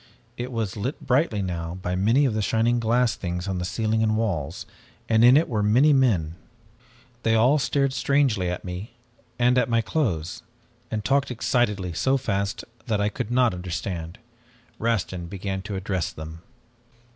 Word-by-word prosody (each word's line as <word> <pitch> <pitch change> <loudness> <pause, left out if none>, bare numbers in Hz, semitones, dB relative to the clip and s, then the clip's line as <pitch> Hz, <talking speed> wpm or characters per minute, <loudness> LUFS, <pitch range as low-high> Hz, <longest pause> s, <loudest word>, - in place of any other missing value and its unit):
"It 125 +1 -5
was 110 -5 -2
lit 120 +8 -3
brightly 125 -6 +1
now 85 -2 -4
by 90 0 -2
many 115 +10 +3
of 125 - +1
the 110 - 0
shining 115 +3 +1
glass 115 +1 +2
things 90 +1 -4
on 90 -2 -2
ceiling 110 +4 0
and 110 -1 +2
walls, 95 -11 -2 0.4
and 110 0 +4
in 125 +3 +8
it 160 - +2
were 110 -4 -1
many 125 +9 +4
men. 95 - +2 0.8
They 115 -1 +2
all 125 +7 +4
stared 140 0 +1
strangely 130 -10 +1
at 90 +1 -5
me 90 +4 -6 0.4
and 125 +1 +4
at - - 0
my 115 -1 +3
clothes, 100 - -2 0.5
and 105 -1 -3
talked 140 0 +2
excitedly 105 -7 0
so 135 +10 +2
fast 100 -6 -2 0.2
that 110 -3 0
I 105 0 +1
could 105 - -5
not 125 -2 +3
understand. 90 -1 -5 0.6
Rastin 95 -6 -1
began 95 +1 -4
to 100 0 -6
address 95 -2 -2
them. 80 +1 -9
110 Hz, 165 wpm, -25 LUFS, 90-125 Hz, 0.8 s, in